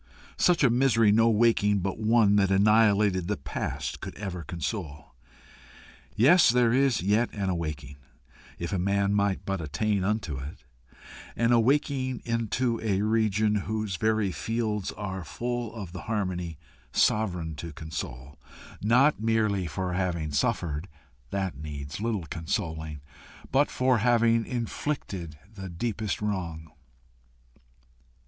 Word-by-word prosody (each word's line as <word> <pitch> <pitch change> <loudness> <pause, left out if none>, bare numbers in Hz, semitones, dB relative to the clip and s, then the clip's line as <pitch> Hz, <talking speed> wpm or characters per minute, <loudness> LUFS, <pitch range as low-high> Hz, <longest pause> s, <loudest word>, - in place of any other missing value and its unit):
Such 175 -4 +4
a 125 - +5
misery 115 -4 +4
no 115 +2 +5
waking 105 -3 +3
but 95 +3 -3
one 110 -2 +4
that 100 -1 +3
annihilated 100 -2 +4
the 105 0 -1
past 70 - -4
could - - -7
ever 95 -4 -5
console. 80 - -5 1.0
Yes, 165 - +6
there 120 -1 +3
is 130 -6 +2
yet 105 +5 +2
an 100 -2 -1
awaking 75 -5 -4 0.6
if 85 +4 -4
a 95 - 0
man 100 +2 +1
might 100 -1 0
but 95 -3 -2
attain 95 +7 -1
unto 95 -9 -1
it 70 +3 -9 0.7
an 115 0 +2
awaking 130 +1 +1
into 115 +1 -1
a 100 -3 0
region 110 -1 +2
whose 110 -2 -2
very 110 -2 +1
fields 110 0 -2
are 95 -2 -5
full 120 +3 -3
of 100 -6 -7
the 90 -1 -7
harmony 90 -7 -3 0.3
sovereign 90 -7 +1
to 85 +2 -6
console, 75 -3 -7 0.4
not 125 +6 +4
merely 110 -5 +1
for 90 +4 -3
having 85 -4 -1
suffered 75 +3 -1 0.4
that 95 -5 -3
needs 75 +2 -6
little 110 -6 -1
consoling, 80 - -4 0.5
but 140 +3 +3
for 130 -2 +2
having 115 0 +3
inflicted 115 - -4 0.2
the 95 -2 -7
deepest 105 +4 -3
wrong. 85 -6 -3
100 Hz, 125 wpm, -27 LUFS, 85-115 Hz, 1.0 s, Yes